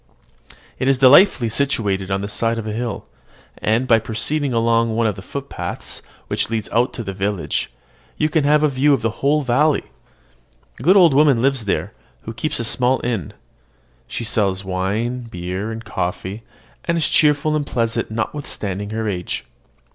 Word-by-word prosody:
It 130 - 0
is 135 -1 +4
delightfully 135 - +6
situated 105 -7 -1
on 95 0 0
the 100 - -3
side 115 +2 -1
of 115 - -4
a 110 - -3
hill; 115 -1 -4 0.5
and, 115 +4 +1
by 115 -3 +5
proceeding 135 +6 -2
along 115 -1 +2
one 115 0 +1
of 105 -3 +1
the 95 - -9
footpaths 140 +8 -6 0.2
which - - -2
lead 110 -2 -2
out 120 +3 +1
of 115 - -5
the 95 - -4
village, 95 -1 -2 0.5
you 155 - +2
can 155 0 +1
have 150 +1 +4
a - - +5
view 140 +1 +3
of - - -6
the 115 - +1
whole 150 +2 +2
valley. 140 +4 +2 1.0
A - - -9
good 180 +9 +5
old 170 -6 +6
woman 140 -3 +5
lives 135 -4 +1
there, 100 +1 -1 0.3
who 115 - -6
keeps 155 +7 -2
a - - -1
small 125 +3 +2
inn. 110 - -2 0.7
She - - -4
sells 100 -3 0
wine, 105 +7 -2
beer, 90 +3 -4
and 115 +1 -7
coffee, 95 +4 -4 0.4
and 170 0 +1
is 160 - +2
cheerful 150 0 +3
and 150 - 0
pleasant 115 -2 -1
notwithstanding 110 -4 -4
her 110 0 -3
age. 90 -4 -3
115 Hz, 175 wpm, -20 LUFS, 105-140 Hz, 1.0 s, delightfully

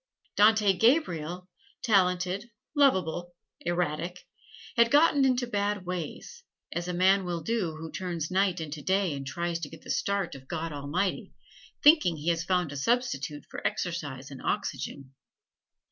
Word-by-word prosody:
Dante 210 -1 +5
Gabriel, 180 - +1 0.4
talented, 190 -1 +2 0.3
lovable, 175 - +2 0.2
erratic, 175 0 -2 0.5
had 235 -1 +5
gotten 290 -1 +5
into 255 -1 +2
bad 205 -3 -1
ways, 180 - -6 0.3
as 170 +1 -3
a 180 - -2
man 190 +2 +4
will 175 -2 -3
who 165 -8 -2
turns 170 -4 -4
night 185 -1 +2
into 155 -1 -5
day 190 0 +1
and 135 -1 -6
tries 170 +4 -2
to 155 -3 -5
get 160 - -13
the - - -5
start 200 -3 -1
of 130 -1 -11
God 165 +2 -3
Almighty, 150 +7 -2 0.5
thinking 295 - +6
he 155 +3 -2
has 165 -1 +1
found 180 -3 0
a 145 - -6
substitute 150 - -1
for - - -7
exercise 145 -6 -4
and 135 - -9
oxygen. 135 -1 -3
180 Hz, 145 wpm, -28 LUFS, 160-200 Hz, 0.5 s, thinking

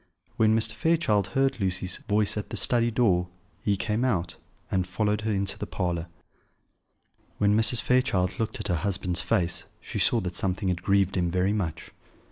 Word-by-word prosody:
When 110 0 +3
Mr. 110 0 +2
Fairchild 115 - +1
heard 135 -2 +1
Lucy's 95 0 -2
voice 105 0 +2
at 105 - -5
the - - -4
study 120 -1 +2
door, 100 -7 +1 0.3
he 100 -1 0
came 105 +4 -1
out, 95 -9 -1 0.4
and 95 -1 0
followed 105 +2 -1
her 110 0 -2
into 100 -1 -1
the - - -4
parlour. 85 -3 -3 1.3
When 105 0 +2
Mrs. 115 +2 +6
Fairchild 125 -8 +1
looked 115 - -3
at - - -3
her 90 - +1
husband's 90 -1 -1
face 90 -7 -1
she - - -6
saw 120 - +3
that 90 -1 -5
something 95 +1 -1
had 85 -1 -2
grieved 100 0 +1
him 90 -1 +1
very 90 +3 0
much. 85 -8 -4
100 Hz, 175 wpm, -26 LUFS, 90-110 Hz, 1.3 s, Mrs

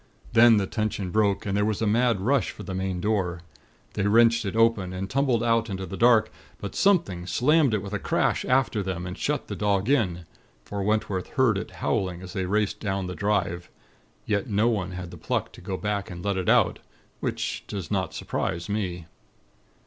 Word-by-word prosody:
Then 115 -1 +7
the 100 - +1
tension 105 -3 -2
broke, 105 -1 +1
and 100 -1 -1
there 105 - +2
was 105 -1 0
a 115 - 0
mad 115 -1 +2
rush 130 +4 +2
for - - -9
the 95 - -6
main 95 -1 -2
door. 90 -5 -1 0.5
They 100 0 0
wrenched 115 +1 +4
it 100 - -3
open, 115 -5 +2
and 95 +1 -4
tumbled 130 -1 +1
out 115 -1 +2
into 95 -1 -4
the 95 - -7
dark; 115 0 +4 0.3
but 100 - -6
something 165 - +2
slammed 140 - +3
it 100 - -2
with 100 0 -7
a 105 - -1
crash - - 0
after 125 -4 +1
them, 90 -2 -4
and 90 0 -5
shut 150 +7 -2
the 100 - -5
dog 100 +2 0
in; 90 -11 +1 0.4
for 100 -1 -4
Wentworth 105 -2 0
heard 130 -6 +3
it 100 - -4
howling 90 -1 -2
as 90 - -9
they 95 -1 -2
raced 105 +1 0
down 95 -2 -2
the 90 - -4
drive. 95 -4 -1 0.6
Yet 105 +3 -1
no 105 +2 +2
one 95 -5 -2
had 90 -1 -6
the 90 - -9
pluck - - -2
to - - -14
go 95 +1 -4
back 105 0 -2
to 90 - -8
let 100 +3 -2
it 95 -2 -1
out, - - +3 0.4
which - - -3
does 95 -4 -6
not 95 -4 -1
surprise 85 0 -3
me. 90 -5 -3
100 Hz, 200 wpm, -26 LUFS, 95-115 Hz, 0.6 s, Then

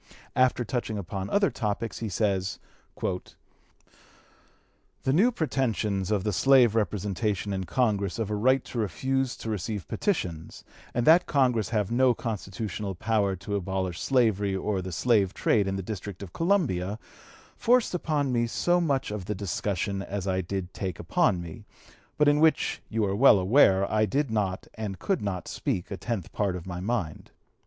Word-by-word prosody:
After 130 -1 +3
touching 110 -2 -2
upon 95 0 -4
other 200 -1 +2
topics 110 0 -3
he 115 - -3
says: 95 -1 0 0.4
"The 90 -1 -3 1.8
new 210 - +4
pretensions 115 - -1
of 105 -3 +1
the 105 -1 -1
slave 125 +1 +5
representation 105 -1 -1
in 95 -1 -3
Congress 100 -5 0
of 110 -2 -2
a - - 0
right 130 +5 +2
to 120 - -5
refuse 130 +6 -1
to 115 - -6
receive 105 -1 -4
petitions, 85 - -3 0.3
and 120 - +1
that 165 +3 +6
Congress 125 - +2
have 105 -3 0
no 125 0 +4
constitutional 100 -2 -4
power 105 -1 +1
to 100 +3 -5
abolish 95 -2 -2
slavery 105 -7 +2
or 95 0 -1
the 95 0 -6
slave 100 +1 +2
trade 105 -3 +2
in 95 - -1
the 95 - -3
District 100 -1 -6
of 90 - -10
Columbia, 130 - +1 0.6
forced 245 -2 +2
upon 150 -6 0
me 120 -1 +1
so 175 +9 +1
much 140 -9 0
of 105 -3 -5
the 105 +2 -3
discussion 100 0 -2
as 100 -1 -4
I 95 0 +1
did 95 0 -4
take 95 -4 -4
upon 85 -1 +1
me, 80 -2 -10 0.5
but 150 - +4
in 145 0 +4
which 160 0 +2
you 110 -1 0
are 95 0 -1
well 120 -1 +7
aware 95 -1 +4
I 110 0 +2
did 140 +4 0
not 100 -4 -1
and 105 -4 -5
could 195 -2 -1
not 95 -4 -3
speak 90 - -3
a - - -2
tenth 100 -1 -4
part 100 -3 -1
of 90 - -7
my 90 -1 -5
mind. 95 -6 -3
105 Hz, 165 wpm, -27 LUFS, 95-125 Hz, 1.8 s, well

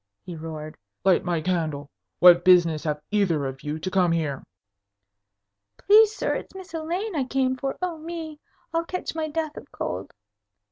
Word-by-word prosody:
he 175 - -7
roared. 155 -1 -7 0.3
"Light 190 -2 +4
my 175 -3 -1
candle! 155 -5 -2 0.3
What 175 -1 +7
business 170 -4 +4
have 150 -1 -2
either 180 -9 +1
of 135 0 -5
you 150 +1 -4
to 185 +4 -4
come 180 -2 +3
here?" 155 -5 -1 1.3
"Please, 430 +1 +5
sir, - - -1
it's - - -6
Miss 380 -1 -10
Elaine 345 +5 -3
I 285 - +1
came 260 0 0
for. 270 +1 -4
Oh, 345 -3 -2
me! 320 -2 -7 0.3
I'll 330 0 +1
catch 365 +2 -4
my 320 -1 -2
death 310 0 -3
of - - -11
cold. 95 +2 -5
185 Hz, 170 wpm, -25 LUFS, -, 1.3 s, What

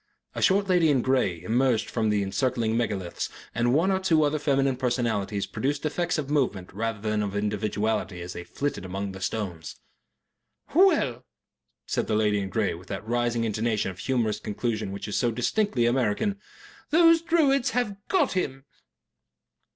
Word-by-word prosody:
A - - -4
short 195 +1 +3
lady 175 -4 +4
in 135 -5 +2
grey 120 -11 +1
emerged 120 +3 +1
from 115 -2 -1
among - - +2
the 105 -1 +1
encircling 115 +3 0
megaliths, 100 -7 -2 0.2
and 120 +1 +1
one 165 +8 +3
or 190 - +1
two 165 -5 +3
other 150 +1 +1
feminine 135 -2 +2
personalities 115 -6 -1
produced 145 +3 -2
effects 170 +3 0
of 150 -3 -2
movement 115 -11 0
rather 115 +1 -2
than 105 0 -1
of 100 -1 -3
individuality 105 -1 -1
as 90 +1 -6
they 85 - -6
flitted 145 +2 -3
among 95 +2 -4
the 95 0 -9
stones. 95 -6 -4 1.0
"Well," 295 - +3 0.6
said - - -1
the 110 - +1
lady 105 -1 +2
in 95 -1 -3
grey, 105 +1 0
with 90 +3 -11
that 100 +2 -6
rising 120 0 0
intonation 110 -2 0
of 90 - -13
humorous 115 -5 0
conclusion 110 -1 -3
which 100 +2 -6
is 105 - -2
so 120 - +2
distinctively 125 - 0
American, 125 - +1 0.5
"those 330 +1 +6
Druids 300 -6 +2
have 235 -4 -1
GOT 380 - +2
him." 135 -7 -2
120 Hz, 165 wpm, -26 LUFS, 105-145 Hz, 1.0 s, those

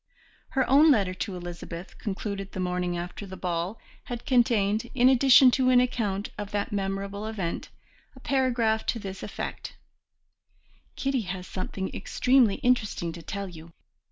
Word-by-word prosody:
Her 265 - +3
own 290 +4 +6
letter 200 -9 +3
to 190 +1 -4
Elizabeth, 175 0 -7
concluded 195 -1 -4
the - - -5
morning 180 -1 -1
after 175 +4 -6
the 190 0 -8
ball, 180 +4 -2 0.3
had 240 -1 -6
contained, 230 -3 +2
in 255 0 +6
addition 260 0 +7
to 255 0 +2
an 250 -1 +6
account 215 -5 -1
of 205 -1 -4
that 205 0 -2
memorable 200 +1 -3
event, 195 -6 -4 0.5
a - - -13
paragraph 245 -5 +1
to - - 0
this 195 -2 -7
effect: - - -6 1.2
"Kitty 270 -2 0
has 180 0 -4
something 190 +1 -5
extremely 250 -5 +3
interesting 220 -9 0
to 170 +1 -9
tell 200 +4 -5
you. 165 -2 -12
205 Hz, 150 wpm, -27 LUFS, 185-245 Hz, 1.2 s, addition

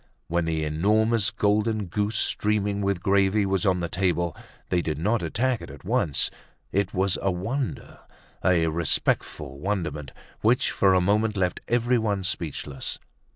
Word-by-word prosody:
When 85 0 0
the 80 -1 -1
enormous 105 +7 +2
golden 105 +1 +1
goose, 105 +4 -1
streaming 105 -1 +1
with 100 -3 -1
gravy, 100 +1 +3
was 95 0 +1
on 90 -1 +2
the 85 - -1
table, 85 -3 0 0.3
they 90 - +2
did 80 -2 -3
not 105 +8 +1
attack 115 +9 0
it - - -9
at - - -12
once. 75 - +1 0.4
It 100 0 0
was 95 0 0
a 95 - +1
wonder, 115 +9 -3 0.4
a 90 -3 +3
respectful 75 -3 0
wonderment, 85 -7 -3 0.3
which 120 +4 +2
for 95 -1 +3
a 90 - +4
moment 105 +3 +1
left 90 -1 0
everyone 115 -4 +1
speechless. 75 -7 -3
95 Hz, 150 wpm, -25 LUFS, 85-105 Hz, 0.4 s, a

